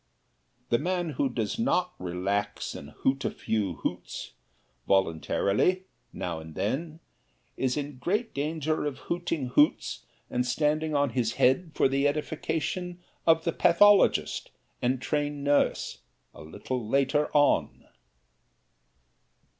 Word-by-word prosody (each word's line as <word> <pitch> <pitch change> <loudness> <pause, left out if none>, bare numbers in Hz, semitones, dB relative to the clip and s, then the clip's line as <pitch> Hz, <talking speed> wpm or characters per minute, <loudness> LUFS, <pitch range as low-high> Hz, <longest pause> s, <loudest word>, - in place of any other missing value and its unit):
The 120 - +3
man 175 0 -1
who 140 0 0
does 115 - -3
not 180 -6 +1
relax 100 +3 -2
and - - -9
hoot 135 0 -1
a - - +1
few 105 -5 -2
hoots - - -4 0.6
voluntarily, 100 - +2 0.3
now 85 -2 -4
and 80 0 -11
then, 155 +9 -2 0.5
is 130 +1 0
in 145 -2 -5
great 205 - -1
danger 155 +2 -1
of 140 -2 -4
hooting 165 -5 -3
hoots 145 +4 +2 0.2
and 125 - 0
standing 150 +4 0
on 140 -2 +2
his 115 -2 0
head 155 +6 +2
for - - +4
the 135 +1 +2
edification 160 +4 -2 0.3
of 165 0 +5
the 170 - 0
pathologist 205 +4 +4 0.3
and 130 +1 0
trained 145 -1 -1
nurse, 145 0 +1 0.3
a - - -12
little 120 +11 -5
later 140 +3 +2
on. 145 -1 +2
145 Hz, 120 wpm, -28 LUFS, 125-160 Hz, 0.6 s, of